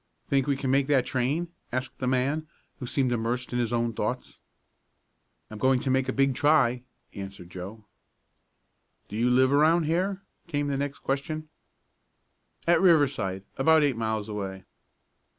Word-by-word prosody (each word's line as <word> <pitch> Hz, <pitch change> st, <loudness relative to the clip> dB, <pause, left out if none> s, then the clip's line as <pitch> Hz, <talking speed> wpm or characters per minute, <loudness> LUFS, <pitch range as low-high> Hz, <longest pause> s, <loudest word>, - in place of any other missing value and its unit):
"Think 135 Hz, -1 st, +2 dB
we 140 Hz, -2 st, +1 dB
can 135 Hz, -2 st, -1 dB
make 135 Hz, 0 st, +3 dB
that 140 Hz, -4 st, +3 dB
train?" 140 Hz, +7 st, -1 dB, 0.2 s
asked 130 Hz, +1 st, -4 dB
the 130 Hz, -, -2 dB
man, 135 Hz, +5 st, 0 dB, 0.3 s
who 125 Hz, -, -5 dB
seemed 130 Hz, -1 st, +1 dB
immersed 120 Hz, +2 st, -2 dB
in 125 Hz, -, 0 dB
his 120 Hz, -1 st, 0 dB
own 120 Hz, -1 st, 0 dB
thoughts. 120 Hz, +4 st, -4 dB, 1.1 s
"I'm 110 Hz, -, -8 dB
going 130 Hz, +1 st, +3 dB
to 130 Hz, -, -1 dB
make 130 Hz, 0 st, +1 dB
a -, -, +2 dB
big 135 Hz, 0 st, +2 dB
try," 130 Hz, -4 st, +3 dB, 0.3 s
answered 95 Hz, -3 st, -9 dB
Joe. 100 Hz, +5 st, -8 dB, 1.2 s
"Do 105 Hz, -, -7 dB
you 120 Hz, +3 st, +2 dB
live 130 Hz, +2 st, +4 dB
around 160 Hz, +4 st, +4 dB
here?" 185 Hz, +5 st, -1 dB, 0.2 s
came 145 Hz, -3 st, -1 dB
the 140 Hz, -, -1 dB
next 140 Hz, 0 st, -4 dB
question. 155 Hz, +3 st, -3 dB, 1.2 s
"At 170 Hz, 0 st, +4 dB
Riverside 140 Hz, -, +3 dB, 0.2 s
about 160 Hz, +3 st, +5 dB
eight 140 Hz, -4 st, +2 dB
miles 110 Hz, -2 st, -2 dB
away." 95 Hz, -3 st, -5 dB
130 Hz, 155 wpm, -27 LUFS, 115-145 Hz, 1.2 s, about